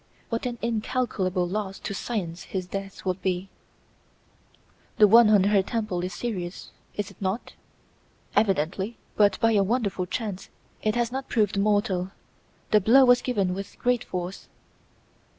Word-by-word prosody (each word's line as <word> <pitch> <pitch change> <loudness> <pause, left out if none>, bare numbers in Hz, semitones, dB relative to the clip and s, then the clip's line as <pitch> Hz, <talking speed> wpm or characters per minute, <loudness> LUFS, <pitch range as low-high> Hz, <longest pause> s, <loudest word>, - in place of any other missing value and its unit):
What 230 +1 -2
an 240 -1 -4
incalculable 215 -6 -1
loss 195 +1 -3
to - - -5
science 185 -5 -3
his 185 -2 -4
death 195 +2 -7
would 185 0 -1
be!" 185 0 -1 1.5
"The 210 - +7
wound 230 +1 +7
on 205 -3 +5
her 200 0 +4
temple 200 -4 -2
is 180 - -3
serious, 180 -3 -5 0.2
is 205 -1 -3
it 200 - -21
not?" 195 +4 -2 0.8
"Evidently; 195 +1 +1 0.2
but, 200 -2 +3
by 225 - +3
a 210 -2 +4
wonderful 200 -3 0
chance, 205 -2 -4 0.3
it 215 +1 0
has 240 -1 0
not 265 +1 -5
proved 215 -3 +1
mortal. 200 -3 +1 0.6
The 210 - +5
blow 260 +7 +6
was 245 0 +5
given 200 -8 0
with 195 +1 -7
great 245 -1 +1
force." 180 +1 -5
205 Hz, 150 wpm, -26 LUFS, 185-230 Hz, 1.5 s, The